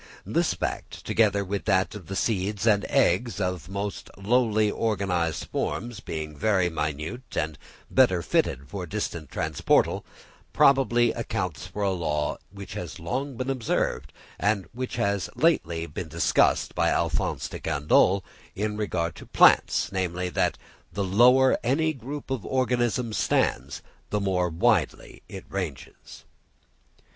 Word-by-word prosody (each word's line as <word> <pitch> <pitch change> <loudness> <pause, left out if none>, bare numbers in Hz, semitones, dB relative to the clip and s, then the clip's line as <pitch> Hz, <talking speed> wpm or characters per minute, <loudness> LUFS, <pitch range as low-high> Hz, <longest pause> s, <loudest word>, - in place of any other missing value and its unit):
This - - +1
fact, - - -5
together 100 -3 +2
with 100 +1 -3
that 95 -3 +2
of 100 -6 -9
the 95 - -5
seeds 105 0 -1
and 105 -3 +3
eggs 105 +6 +2
of 90 -4 -2
most 100 +1 -4
lowly 110 0 +2
organised 95 -8 -1
forms 120 -2 -3
being 80 -7 -5
very 95 +1 +1
minute 80 - -4
and 80 -1 -1 0.3
better 95 -10 +3
fitted 70 -2 0
for 95 0 -6
distant 75 -1 -4
transportal, - - +1 0.5
probably 120 -4 +4
accounts 110 -8 -3
for 105 - -4
a 100 - +2
law 75 -5 -1
which 100 0 -9
has 85 -2 -6
long 130 - -3
been 130 +2 -1
observed, 90 - -1 0.3
and 105 -2 +1
which 130 +2 -4
has 100 -5 0
lately 85 - +1
been 75 - -6
discussed - - +2
by - - +2
Alph. - - +1 0.3
de - - -7
Candolle 90 +7 +3 0.3
in 105 +1 -2
regard 85 -6 -1
to - - -11
plants, - - +4
namely, 90 -1 -2
that 85 - 0 0.3
the 100 +3 -2
lower 125 +7 +5
any 155 +6 +1
group 135 +2 -7
of 130 -6 -2
organisms 125 -3 0
stands 65 +3 0 0.3
the 105 - 0
more 90 -3 0
widely 95 - 0
it 95 - -8
ranges. 90 -8 -7
100 Hz, 135 wpm, -26 LUFS, 85-120 Hz, 0.5 s, lower